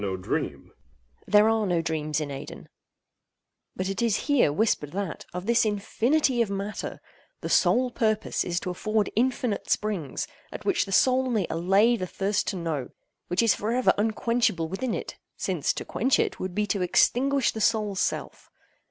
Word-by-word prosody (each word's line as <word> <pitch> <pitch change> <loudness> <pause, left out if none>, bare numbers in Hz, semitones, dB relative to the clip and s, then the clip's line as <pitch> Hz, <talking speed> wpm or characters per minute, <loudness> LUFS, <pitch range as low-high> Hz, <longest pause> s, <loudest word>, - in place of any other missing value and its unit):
There 210 +1 +5
are 220 -2 +2
no 175 -2 +1
dreams 155 -2 -1
in 150 -2 -3
Aidenn—but 185 +6 -11
it 195 +4 -2
is 230 -3 +2
here 285 - +3
whispered 150 -4 0
that, 195 -4 -4
of 180 +1 -6
this 235 +1 +3
infinity 235 +6 +1
of 225 - +1
matter, 200 +1 -4 0.4
the - - -4
sole 250 +1 +3
purpose 220 -3 0
is 175 -1 -1
to 180 - -3
afford 215 +3 -1
infinite 240 -2 0
springs, 200 -9 -1 0.3
at - - -8
which 385 - +2
the - - -7
soul 255 +5 +3
may 215 -6 +1
allay 195 +8 +3
the 185 - -4
thirst 200 +3 -1
to - - -1
know, 160 -7 -3 0.4
which 180 +6 +1
is 230 - +5
for 215 +2 -3
ever 255 +1 +3
unquenchable 220 -5 0
within 215 +7 -2
it—since - - -3
to - - -6
quench 265 - +1
it, - - -1
would 185 -1 -4
be 210 - +1
to 200 -2 -1
extinguish 265 +8 +2
the 220 - -5
soul's 210 -3 +1
self. - - -3
210 Hz, 160 wpm, -26 LUFS, 180-235 Hz, 0.4 s, There